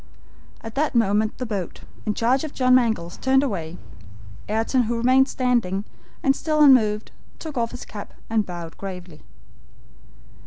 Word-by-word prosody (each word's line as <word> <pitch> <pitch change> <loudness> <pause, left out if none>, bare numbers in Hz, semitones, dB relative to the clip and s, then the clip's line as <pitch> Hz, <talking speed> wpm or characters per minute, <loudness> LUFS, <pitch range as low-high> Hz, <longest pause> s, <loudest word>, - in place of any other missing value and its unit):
At 225 -1 -8
that 295 0 0
moment 215 -1 +2
the 255 - -3
boat, 200 -6 -5 0.3
in 210 - 0
charge 250 +5 +2
of 310 - -6
John 255 -1 +3
Mangles, 220 -9 +1
turned 265 +1 +3
away. 175 - -3 0.7
Ayrton, 225 +3 +1
who 235 +1 -1
remained 255 +3 +4
standing, 235 -8 0 0.4
and 270 0 +3
still 305 +1 -1
unmoved, 220 -7 +5 0.3
took 315 -3 -8
off 230 -2 0
his 245 - -9
cap 205 -1 -9
and 220 -1 +1
bowed 175 -3 -8
gravely. 180 -5 -8
230 Hz, 150 wpm, -23 LUFS, 200-260 Hz, 0.7 s, unmoved